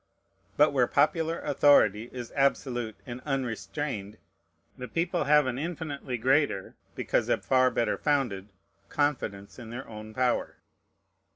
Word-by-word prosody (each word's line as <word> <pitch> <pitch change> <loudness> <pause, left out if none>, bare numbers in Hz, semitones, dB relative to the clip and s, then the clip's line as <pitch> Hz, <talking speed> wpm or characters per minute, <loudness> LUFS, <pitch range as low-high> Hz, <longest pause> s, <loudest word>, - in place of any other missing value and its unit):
But 150 0 +5
where 125 -3 +3
popular 160 +3 +1
authority 120 -6 +4
is 125 -2 -7
absolute 125 -5 0
and 120 +1 -7
unrestrained, 125 -4 -3 0.6
the 125 - -7
people 170 +3 -1
have 150 0 +5
an 130 0 -2
infinitely 150 -5 -4
greater, 130 -4 +1 0.2
because - - 0
a - - +3
far 130 -1 +3
better 120 - -1
founded, 120 -10 0 0.4
confidence 130 -9 -2
in 115 -2 -9
their 120 +3 -7
own 110 0 -10
power. 125 -1 0
130 Hz, 125 wpm, -28 LUFS, 115-145 Hz, 0.6 s, But